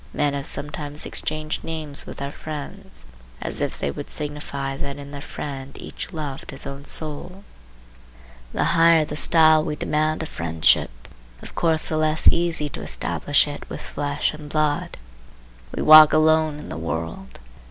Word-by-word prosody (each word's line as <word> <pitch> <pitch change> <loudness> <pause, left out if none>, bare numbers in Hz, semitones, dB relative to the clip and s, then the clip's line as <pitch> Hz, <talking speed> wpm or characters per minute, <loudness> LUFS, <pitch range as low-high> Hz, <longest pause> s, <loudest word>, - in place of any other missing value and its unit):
Men 145 -1 +1
have 140 -1 -1
sometimes 150 0 -3
exchanged 155 0 -3
names 155 -3 -5
with - - -8
their 140 0 -4
friends, 160 +7 -7 0.3
as - - -3
if - - -1
they 70 - -2
would - - -7
signify 145 -2 -4
that 140 0 -4
in 140 0 -9
their 140 -1 -7
friend 135 -2 -7
each - - -7
loved 150 -6 -6
his 135 - -3
own 140 +1 -7
soul. 165 +7 -1 1.1
The - - 0
higher 165 -1 +5
the 150 - -6
style 155 0 +5
we 150 - -2
demand 155 +1 0
of 160 - -6
friendship, 80 -1 +2 0.5
of - - -10
course 160 -2 +2
the 155 - -1
less 155 0 +2
easy 170 -3 0
to - - -7
establish 145 +1 +1
it 145 0 -7
with - - -6
flesh 145 +1 -1
and 150 -1 -9
blood. 150 -1 0 0.7
We - - -3
walk 155 0 +10
alone 155 -1 +3
in 150 - -9
the - - -5
world. 80 -5 -5
150 Hz, 165 wpm, -23 LUFS, 140-155 Hz, 1.1 s, walk